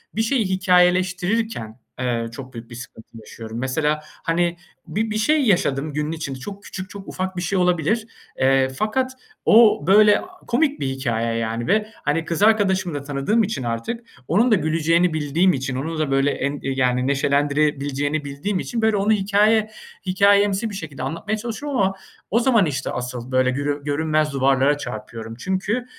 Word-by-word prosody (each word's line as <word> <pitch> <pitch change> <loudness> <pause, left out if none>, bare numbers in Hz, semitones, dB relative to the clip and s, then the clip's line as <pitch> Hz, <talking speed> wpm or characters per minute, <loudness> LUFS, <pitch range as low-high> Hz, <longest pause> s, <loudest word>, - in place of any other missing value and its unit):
bir 225 - +1
şeyi 225 -1 +1
hikâyeleştirirken, 185 - +1 0.2
eee, 120 -2 -1
çok 130 +2 -9
büyük 115 0 -9
bir 120 - -9
sıkıntı 115 -2 -11
yaşıyorum. 110 +1 -8
Mesela, 150 +4 0 0.2
hani, 170 +1 0 0.3
bi 220 +1 -2
bir 215 - -1
şey 300 +7 +3
yaşadım 155 - +1
günün 150 +1 -2
için 155 -4 -4
çok 200 +10 -8
küçük, 190 -1 -7
çok 200 -1 -10
ufak 185 0 -4
bir - - -1
şey 190 +2 -1
olabilir, 180 +6 +1 0.3
eee, 135 0 +3
fakat 220 - -1 0.3
o 215 -9 +5
böyle 210 +1 +6 0.3
komik 285 +4 +1
bir 135 - -1
hikâye, 115 -4 -1
yani, 115 +1 -2
ve, 215 +2 +1 0.2
hani, 160 +2 0
kız 170 +4 -1
arkadaşımı 190 -6 +3
da 145 - -3
tanıdığım 145 +11 +1
için 205 - -3
artık 120 - -4 0.2
onun 225 +9 +3
da 215 - +7
güleceğini 165 +1 +2
bildiğim 160 +4 +2
için, 130 -1 -3
onun 155 +4 -3
da 150 -3 -1
böyle 135 +1 +2
en 140 +1 -2
yani, 130 -1 0
neşelendirebileceğini 145 +1 0
bildiğim 175 +8 -3
için 230 -2 -3
böyle 220 -1 +3
onu 205 +2 +2
hikâye 210 +2 +3 0.4
hikâyemsi 200 +3 +3
bir 205 - -7
şekilde 145 -8 -7
anlatmaya 165 +10 -3
çalışıyorum 245 +5 -4
ama 195 0 +2 0.4
o 230 - +4
zaman 235 -5 +3
işte 145 -5 -3
asıl 125 0 -5
böyle 130 0 +3
görü 145 +2 -2
görünmez 155 0 0
duvarlara 135 +1 +3
çarpıyorum. 115 -3 -7
Çünkü, 190 - -1
160 Hz, 165 wpm, -22 LUFS, 135-205 Hz, 0.4 s, da